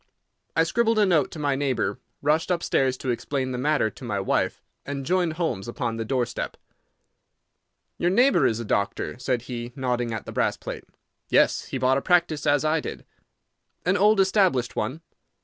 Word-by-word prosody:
I 165 - +5
scribbled 225 +6 +1
a 210 - +5
note 170 -6 +3
to - - -9
my 145 -2 0
neighbour, 135 -2 -1 0.2
rushed 155 +4 +2
upstairs 135 -7 +1
to 130 - -2
explain 130 +2 -2
the 125 - -3
matter 145 -5 +1
to - - -14
my 105 -5 -2
wife, 95 - 0 0.2
and 140 -1 -5
joined 175 -1 +1
Holmes 155 - -2
upon 115 -1 -3
the 115 - -2
door 125 +2 0
step. 120 - -5 1.4
"Your 175 - +2
neighbour 200 - +4
is 110 - -1
a 115 - -4
doctor," 100 +3 -1
said 125 -2 -1
he, 120 -1 -6
nodding 125 -3 -1
at 110 -2 -4
the - - -7
brass - - 0
plate. - - -7 0.4
"Yes; - - +3
he - - -4
bought 130 +1 +3
a - - -9
practice 170 -4 +2
as 145 +1 +3
I 155 +1 +2
did." - - -7 0.8
"An 180 +2 +3
old 210 +1 +4
established 190 - +2
one?" 130 +10 -2
140 Hz, 185 wpm, -25 LUFS, 125-170 Hz, 1.4 s, I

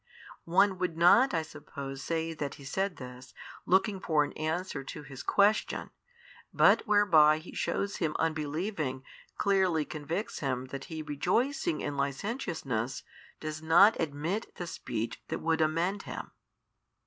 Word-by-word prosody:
One 190 +2 +4
would 180 -3 -2
not 235 +10 +6
I 165 -2 0
suppose 140 -3 -8
say 165 0 -2
that 145 -3 -4
he 140 - -13
said 190 +7 -2
this, 125 0 -10 0.3
looking 190 +2 +3
for 155 -5 +2
an 145 - -5
answer 155 -2 -3
to 150 +2 -8
his 135 -2 -9
question, 205 +2 +2 0.6
but - - +4
whereby 165 -8 +6
he 160 +3 -10
shews 200 0 -2
him 160 -3 -1
unbelieving 155 -2 -2 0.3
clearly 190 -6 +2
convicts 160 +8 -4
him 130 -3 -2
that 140 - -5
he 160 -3 -6
rejoicing 260 - 0
in 145 -1 -3
licentiousness 140 - -2 0.4
does 155 0 -5
not 175 +7 +6
admit 165 +8 -3
the 175 - -5
speech 120 -9 -4
that - - -2
would 160 0 0
amend 170 +6 +1
him. - - -7
160 Hz, 140 wpm, -30 LUFS, 145-190 Hz, 0.6 s, not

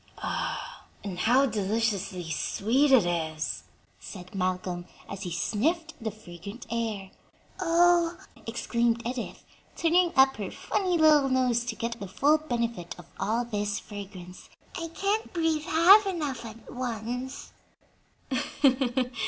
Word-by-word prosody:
"And 185 -3 -5
how 250 +7 +4
deliciously 205 -5 -1
sweet 255 - +1
it 255 -8 +7
is!" 160 -3 -2 0.3
said 180 -3 -10
Malcolm 180 -2 -2 0.2
as 195 - -7
he 180 -3 -4
sniffed 320 - 0
the 220 - 0
fragrant 200 +1 -10
air. 220 -5 -2 0.5
"Oh!" 345 0 +4 0.3
exclaimed 235 0 0
Edith, 245 0 -4 0.3
turning 345 +1 +3
up 265 0 +5
her 200 -3 -4
funny 370 -3 -1
little 305 -3 +5
nose 250 -2 +2
to - - -3
get 230 0 -4
the 200 - -5
full 290 +11 +3
benefit 235 - -3
of - - -12
all 230 +3 0
this 205 -3 -2
fragrance; 190 -3 -10 0.3
"I 335 - -3
can't 400 +6 -1
breathe 325 -3 0
half 375 +5 +7
enough 295 -10 -3
at 225 0 -10
once." 250 +2 -4
235 Hz, 120 wpm, -28 LUFS, 200-305 Hz, 0.5 s, it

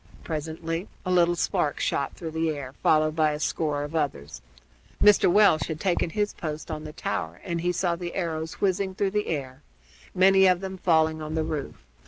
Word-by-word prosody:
Presently 165 +3 -4 0.2
a 185 - -1
little 175 -1 +4
spark 150 -3 0
shot 140 - -1
through 165 -2 -6
the 160 0 0
air, 140 -4 -5
followed 155 0 +3
by 155 -2 +2
a 150 - -4
score 150 -2 -1
of 145 +2 -7
others. 70 - -3 0.6
Mr. 210 -3 +6
Welch 195 -7 +4
had 155 -2 -4
taken 180 -2 0
his 210 +4 -1
post 155 0 -6
on 155 0 -5
the 150 - -8
tower, 85 - -4
and 170 -1 -3
he 175 +1 +1
saw 175 0 0
the 175 0 -6
arrows 160 -3 -3
whizzing 190 -1 0
through 195 0 0
the 210 +1 -1
air, 135 -5 -4 0.5
many 190 +1 +6
of 180 -1 +3
them 190 0 -6
falling 160 -2 +2
on 155 +1 -4
the 160 - +1
roof. 150 - -5
160 Hz, 195 wpm, -26 LUFS, 155-180 Hz, 0.6 s, Mr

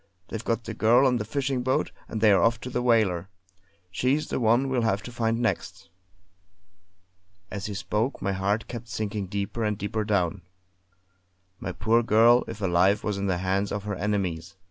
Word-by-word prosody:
They've 115 0 -5
got 115 0 -1
the 115 - -6
girl 115 +5 +4
on 125 -2 +3
the 110 - -2
fishing 135 +2 -1
boat; 130 +1 0 0.2
and 110 - -5
they're 105 -3 +5
off 115 0 +3
for 125 +2 -8
the 125 - -1
whaler. 105 -7 +2 0.6
She's 130 +9 0
the - - -1
one 120 +3 +3
we'll 130 -2 0
have 110 -3 0
to 125 - -8
find 115 -1 0
next!" 115 -7 -3 1.6
As 100 -2 -4
he 105 - -5
spoke 110 +6 -1
my 100 - -1
heart 100 +4 -1
kept 120 -1 -7
sinking 105 -3 -3
deeper 100 +4 -3
and 105 -1 0
deeper 110 +2 -2
down. 100 -3 0 1.2
My - - -4
poor 115 +2 +2
girl, 115 +2 +5
if 110 - -7
alive, 95 +2 +3
was 105 -2 -2
in 100 - -1
the 90 -2 +1
hands 95 +2 0
of 105 -1 -3
her 105 0 -3
enemies. 95 -3 -2
110 Hz, 185 wpm, -26 LUFS, 100-120 Hz, 1.6 s, they're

